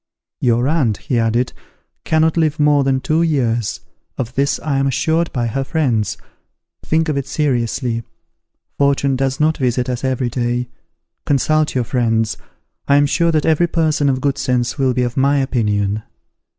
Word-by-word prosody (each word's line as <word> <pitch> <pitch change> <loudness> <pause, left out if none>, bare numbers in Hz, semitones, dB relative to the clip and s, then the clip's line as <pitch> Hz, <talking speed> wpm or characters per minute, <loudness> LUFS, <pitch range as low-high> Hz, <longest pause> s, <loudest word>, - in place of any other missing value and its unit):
"Your 120 +1 +2
aunt," 140 -9 +1
he 125 - -1
added, 115 +2 0 0.5
"cannot 160 0 +2
live 155 -2 +1
more 145 -1 +4
than 135 -1 +1
two 155 +4 +1
years; 120 -9 0 0.4
of 125 -1 -4
this 140 +1 0
I 140 -3 -1
am 135 - +1
assured 160 +5 0
by 120 -3 -1
her 135 +4 -2
friends. 125 - 0 0.7
Think 160 +1 +1
of 150 -2 -1
it 140 -1 -3
seriously. 125 -4 -1 0.8
Fortune 140 -1 +2
does 135 +2 -1
not 155 +1 +2
visit 125 -1 0
us 125 0 -3
every 130 -2 -1
day. 120 0 -1 0.6
Consult 155 +2 +1
your 125 - +1
friends. 115 -2 0 0.5
I 140 - +4
am 145 0 +5
sure 170 +3 +1
that 155 -2 +1
every 165 +2 +3
person 155 -3 +1
of 130 -1 0
good 140 -1 0
sense 125 0 -1
will 130 -2 +2
be 125 - +1
of 120 +1 -3
my 140 +2 +3
opinion." 105 -6 0
135 Hz, 165 wpm, -18 LUFS, 120-150 Hz, 0.8 s, am